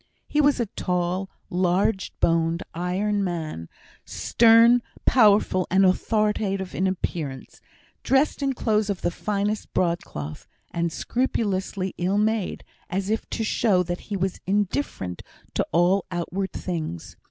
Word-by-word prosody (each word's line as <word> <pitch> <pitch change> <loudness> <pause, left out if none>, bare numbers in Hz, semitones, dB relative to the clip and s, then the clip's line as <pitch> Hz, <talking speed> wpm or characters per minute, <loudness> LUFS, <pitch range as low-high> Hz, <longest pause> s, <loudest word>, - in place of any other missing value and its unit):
He 300 - +2
was 285 -2 +3
a 235 - +1
tall, 180 -1 -2 0.2
large 185 +2 +1
boned, 165 0 +1
iron 195 +4 0
man; 160 - -4 0.3
stern, 230 +1 +5 0.2
powerful, 205 -6 +4
and 190 +2 +4
authoritative 195 -1 +1
in 190 - +1
appearance; 160 -7 -4 0.4
dressed 270 +2 +2
in 275 -1 +1
clothes 215 -3 0
of 200 - -2
the - - +1
finest 205 +3 -2
broadcloth, 75 - -2 0.2
and 170 0 -1
scrupulously 195 -5 -1
ill 185 +3 +1
made, 215 -2 0 0.3
as 195 +3 -2
if 220 - -2
to 225 - -2
show 205 -4 +2
that 175 0 -4
he 205 - -1
was 190 0 -2
indifferent 195 - -1 0.3
to - - 0
all 175 +4 +3
outward 180 +2 -3
things. 155 - -5
190 Hz, 130 wpm, -24 LUFS, 175-210 Hz, 0.4 s, stern